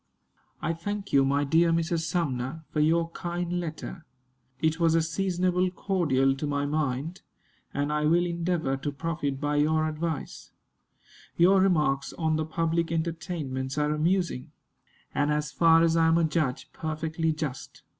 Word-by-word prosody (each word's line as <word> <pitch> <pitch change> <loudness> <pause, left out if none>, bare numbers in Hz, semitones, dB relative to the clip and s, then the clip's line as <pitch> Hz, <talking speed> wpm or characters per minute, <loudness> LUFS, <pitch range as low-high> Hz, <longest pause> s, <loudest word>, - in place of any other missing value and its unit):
I 165 - 0
thank 200 +4 -5
you, 140 -1 +6
my 140 +1 +2
dear 165 +4 +3
Mrs. 165 0 0
Sumner, 155 -3 -2
for 150 - -1
your 165 +2 +2
kind 175 0 -3
letter. 165 +1 -6 0.6
It 160 +2 +1
was 165 -1 +3
a 165 - +4
seasonable 180 +2 0
cordial 155 -8 +1
to 150 - -3
my 145 0 -1
mind, 150 +3 -2 0.5
and 145 +1 -1
I 150 0 +1
will 170 +3 +3
endeavor 170 -5 -1
to 145 +2 -3
profit 145 -2 -3
by 145 0 0
your 155 +1 +2
advice. 155 0 -4 0.8
Your 185 +3 +5
remarks 150 -7 +1
on 160 -2 0
the 155 0 -1
public 165 +1 -1
entertainments 160 -5 -3
are 150 0 +1
amusing, 170 -3 0 0.6
and, 145 +1 +1
as 150 0 -1
far 165 -1 +5
as 165 0 +3
I 165 -1 +4
am 165 +1 +4
a 170 - +3
judge, 150 -5 -1
perfectly 160 +1 -2
just. 155 -4 -5
160 Hz, 155 wpm, -27 LUFS, 150-170 Hz, 0.8 s, you